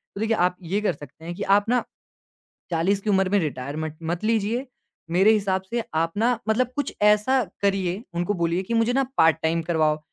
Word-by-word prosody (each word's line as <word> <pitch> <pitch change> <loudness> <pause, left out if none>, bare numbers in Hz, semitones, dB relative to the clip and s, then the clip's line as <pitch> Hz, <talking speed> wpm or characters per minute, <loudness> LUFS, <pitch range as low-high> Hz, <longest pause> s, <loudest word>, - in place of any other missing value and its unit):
तो - - -6
देखिए, 225 0 +1
आप 180 +1 +2
ये 180 +4 -1
कर 210 - +1
सकते 145 +2 -13
हैं 170 - -4
कि 200 - -4
आप 205 0 +2
ना, 245 0 +2 0.9
40 185 +5 +1
की 210 - -3
उम्र 190 -1 +3
में 205 +1 +3
रिटायरमेंट 150 +1 -4
मत 170 +4 -3
लीजिए, 225 +3 0 0.5
मेरे 190 +5 +5
हिसाब 195 -3 +1
से 235 -1 -1
आप 165 +1 +1
ना 235 +2 +2
मतलब 245 +3 +2
कुछ 285 -2 -2
ऐसा 210 +5 +4 0.2
करिए, 195 0 0
उनको 175 +4 -1
बोलिए 170 0 0
कि 230 - -4
मुझे 230 +1 +2
ना 270 +1 +2
पार्ट-टाइम 160 +1 +3
करवाओ 155 -2 +1
195 Hz, 195 wpm, -24 LUFS, 165-220 Hz, 0.9 s, मेरे